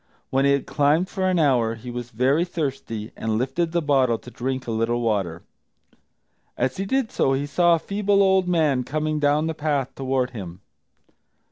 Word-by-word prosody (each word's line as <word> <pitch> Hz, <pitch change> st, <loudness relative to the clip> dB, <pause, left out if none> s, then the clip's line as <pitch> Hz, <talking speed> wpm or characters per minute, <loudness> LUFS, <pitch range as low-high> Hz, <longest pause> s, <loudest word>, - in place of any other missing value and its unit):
When 135 Hz, +1 st, +2 dB
he 140 Hz, -, +4 dB
had 140 Hz, -, 0 dB
climbed 150 Hz, +6 st, +2 dB
for 190 Hz, -1 st, -1 dB
an 185 Hz, -, +1 dB
hour 125 Hz, -8 st, +2 dB
he 120 Hz, +2 st, -8 dB
was 120 Hz, 0 st, -6 dB
very 130 Hz, +7 st, +2 dB
thirsty, 135 Hz, -10 st, -4 dB
and 110 Hz, -1 st, -2 dB
lifted 135 Hz, +8 st, -1 dB
the 170 Hz, -1 st, 0 dB
bottle 130 Hz, -5 st, +2 dB
to 125 Hz, -, -13 dB
drink 130 Hz, +2 st, -3 dB
a 115 Hz, -, -4 dB
little 115 Hz, +2 st, 0 dB
water. 100 Hz, -8 st, -1 dB, 1.1 s
As 130 Hz, +1 st, -1 dB
he 195 Hz, +1 st, -3 dB
did 265 Hz, 0 st, 0 dB
so 135 Hz, -, +1 dB
he 135 Hz, +2 st, -1 dB
saw 170 Hz, +3 st, +3 dB
a -, -, 0 dB
feeble 200 Hz, +3 st, +1 dB
old 190 Hz, -1 st, +3 dB
man 155 Hz, -7 st, +2 dB
coming 155 Hz, +2 st, -2 dB
down 150 Hz, +1 st, +2 dB
the 160 Hz, -, -1 dB
path 145 Hz, -4 st, -1 dB
toward 130 Hz, -1 st, -1 dB
him. 95 Hz, -6 st, -8 dB
135 Hz, 190 wpm, -23 LUFS, 120-165 Hz, 1.1 s, he